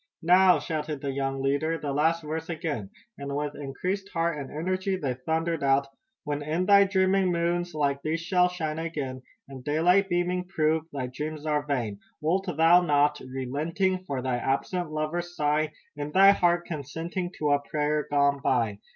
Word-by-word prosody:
"Now!" 180 +1 +6
shouted 150 0 -3
the 140 - -2
young 135 0 -2
leader, 145 +4 +1
"The 145 -2 -4
last 160 +3 +1
verse 160 +2 -4
again!" 155 - -3 0.3
and 140 0 -4
with 145 0 -2
increased 180 +8 -4
heart 165 -1 0
and 140 -3 -6
energy 185 +5 -1
they 140 -8 -2
thundered 160 +5 -2
out: 135 0 +3 0.4
"When 145 -1 -3
in 160 +5 -1
thy 200 +1 +7
dreaming 190 -1 +2
moons 175 0 -1
like 140 -2 0
these 155 +3 -1
shall 180 +1 +2
shine 160 -3 -3
again, 145 -6 -4 0.3
And 135 -2 -10
daylight 175 +7 +3
beaming 180 +1 0
prove 160 -3 0
thy 135 -3 -3
dreams 150 +4 -5
are 150 -1 0
vain, 115 -8 -2 0.2
Wilt 185 +6 0
thou 165 +1 +5
not, 150 -2 +2
relenting, 150 +9 -2
for 135 -5 -3
thy 130 -2 0
absent 140 +7 -1
lover 155 +3 -1
sigh? 155 -3 -1 0.2
In 145 0 -5
thy 195 +4 +7
heart 175 -3 +2
consenting 165 +4 -4
to 150 -1 0
a 145 - +4
prayer 150 0 -1
gone 140 -1 +2
by! 105 -3 +1
155 Hz, 170 wpm, -27 LUFS, 140-175 Hz, 0.4 s, thy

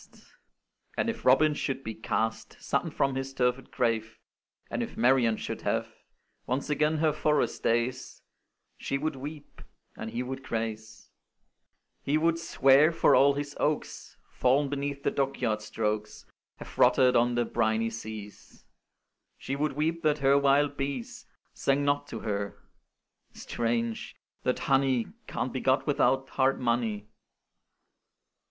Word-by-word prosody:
And 230 - +1
if 230 - -11
Robin 150 +4 +5
should 135 -2 -3
be 110 - -4
cast 110 0 -3
Sudden - - -1
from 135 -1 0
his 135 0 -4
turfed 125 0 0
grave, 110 -1 -1 0.5
And - - -3
if - - -5
Marian 120 -2 +3
should - - -5
have - - -1 0.6
Once 135 +4 -2
again 150 +2 +2
her 155 -1 +2
forest 150 0 0
days, 120 +3 -1 0.6
She 140 - -2
would 155 +1 -2
weep, 145 +2 -9 0.3
and 110 - -6
he 115 +3 -3
would 130 +1 -6
craze: 110 -2 -5 0.9
He 145 +2 +1
would 165 +1 +1
swear, 145 -1 +4
for 165 - +3
all 140 +1 +5
his 145 0 -4
oaks, 150 0 -2
Fall'n 135 +3 +2
beneath 140 0 -3
the - - +1
dockyard 130 -6 -1
strokes, 105 0 -3 0.3
Have - - -11
rotted 125 -1 +5
on 120 +1 +3
the 120 0 +1
briny 110 +1 0
seas; 110 -2 -9 0.7
She 135 - -4
would 150 +1 -1
weep 160 +4 -1
that 155 -2 +2
her 140 -1 +4
wild 140 +1 +3
bees 140 -4 -5 0.3
Sang 140 +1 +1
not 145 0 +1
to - - -7
her 100 -2 -3 0.8
strange! 115 -1 -2 0.3
that - - 0
honey 135 -3 +1 0.2
Can't - - -3
be - - -3
got - - +2
without 135 +2 +2
hard 135 0 +1
money! 115 -4 -1
135 Hz, 140 wpm, -28 LUFS, 115-145 Hz, 0.9 s, Robin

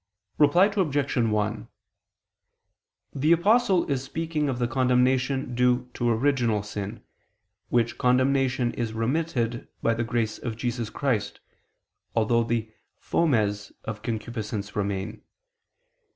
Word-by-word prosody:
Reply 155 +6 +6
Obj. 155 -9 0
1: 110 -2 0 1.5
The 150 +4 +1
Apostle 190 +1 +4
is 135 -3 -1
speaking 155 +1 -2
of 130 - -2
the 120 -1 0
condemnation 125 +1 +1
due 125 0 +1
to 120 - 0
original 115 -3 +1
sin, 105 +2 -6 0.7
which 120 -1 +1
condemnation 130 0 +2
is 115 -2 -3
remitted 120 -1 -1 0.2
by 115 - +3
the 115 +1 -1
grace 115 -1 -1
of 115 -3 -5
Jesus 120 -2 -2
Christ, 125 -7 -1 0.8
although 115 +1 +3
the 115 -1 -2 0.2
fomes 105 -10 0
of 110 -2 -5
concupiscence 110 -2 -4
remain. 100 +1 -3
120 Hz, 110 wpm, -26 LUFS, 110-135 Hz, 1.5 s, Reply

